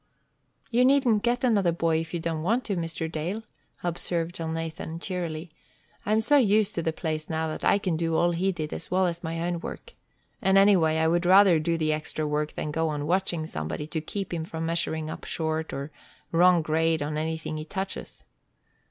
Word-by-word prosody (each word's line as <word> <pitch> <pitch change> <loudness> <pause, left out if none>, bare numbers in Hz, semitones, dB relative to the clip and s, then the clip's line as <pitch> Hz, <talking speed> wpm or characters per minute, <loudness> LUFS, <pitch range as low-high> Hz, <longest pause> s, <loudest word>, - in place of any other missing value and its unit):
"You 245 +2 +4
needn't 255 -5 +4
get 240 +2 0
another 205 -8 +3
boy 165 -1 +1
if 165 0 -5
you 175 - -2
don't 165 -1 -2
want 230 +9 +1
to, 200 - -2
Mr. 165 -1 -3
Dale," 175 +8 -3 0.4
observed 170 -1 -2
Elnathan, 165 0 -4
cheerily. 170 -3 -4 0.6
"I - - +1
am 220 +1 +4
so 290 +6 +4
used 215 -4 +3
to 170 - -1
the 160 - 0
place 155 -1 -4
now 160 0 -1
that 155 - -6
I - - +4
can 185 -5 -1
do 165 0 0
all 175 +1 +3
he 185 +3 +1
did, 155 -4 -4
as - - -6
well 185 +1 +2
as 170 0 -2
my 165 0 -3
own 175 0 -1
work. - - -8 0.5
And, 190 0 +4
anyway, 185 -6 +5
I 160 0 +2
would 175 +2 +1
rather 190 -3 +7
do 165 +2 0
the 155 -1 +1
extra 155 0 -3
work 150 0 -1
than 150 - -3
go 160 +1 0
on 145 -1 -3
watching 175 -1 0
somebody 80 - -4
to 160 - -2
keep 195 +4 -5
him 165 -2 -2
from 160 0 -5
measuring 165 -1 -1
up - - -8
short 160 0 -2
or 140 +2 -5 0.4
wrong 175 0 +5
grade 160 0 +1
on 150 +1 -3
everything 160 0 -3
he 155 - -5
touches." 190 +2 -6
165 Hz, 205 wpm, -27 LUFS, 160-185 Hz, 0.6 s, rather